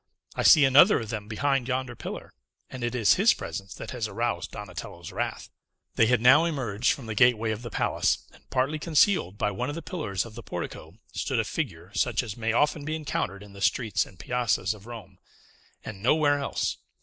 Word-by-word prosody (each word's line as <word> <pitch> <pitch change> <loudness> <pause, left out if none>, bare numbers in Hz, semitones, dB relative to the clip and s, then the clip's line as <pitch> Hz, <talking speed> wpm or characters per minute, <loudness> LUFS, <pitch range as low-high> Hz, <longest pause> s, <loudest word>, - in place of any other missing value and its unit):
I - - -2
see 150 -3 +7
another 145 +10 +6
of 115 -3 -6
them 105 -3 -5
behind 135 +3 0
yonder 130 -1 -2
pillar; - - -8 0.4
and 130 -2 -6
it 120 +1 -2
is 115 -4 +5
his 215 +5 +5
presence 100 -2 -7
that - - -8
has 120 -4 -3
aroused 105 -3 -2
Donatello's 90 -6 -8
wrath." - - -4 0.4
They 110 - +4
had 125 -1 +3
now 135 +6 +7
emerged 125 -9 0
from 135 - -4
the 110 - -4
gateway 115 -1 +3
of 110 +1 -4
the 120 - -7
palace; - - 0
and - - -22
partly 135 +4 0
concealed 155 - +2
by 105 - 0
one 125 +7 -3
of 145 - -4
the 165 - -6
pillars 105 - -3
of 115 - -11
the - - -8
portico - - -7 0.2
stood - - -1
a - - +2
figure - - -5
such - - +1
as 105 - -6
may 115 -1 -1
often 145 +5 +1
be 155 +2 -2
encountered 105 -10 -3
in 100 -1 -14
the 100 - -11
streets 110 +2 +1
and 95 - -17
piazzas 110 -1 0
of 105 +1 -14
Rome, 115 -3 -10 0.7
and 100 -3 -8
nowhere 145 +4 +3
else. 140 - -2
120 Hz, 205 wpm, -27 LUFS, 105-140 Hz, 0.7 s, see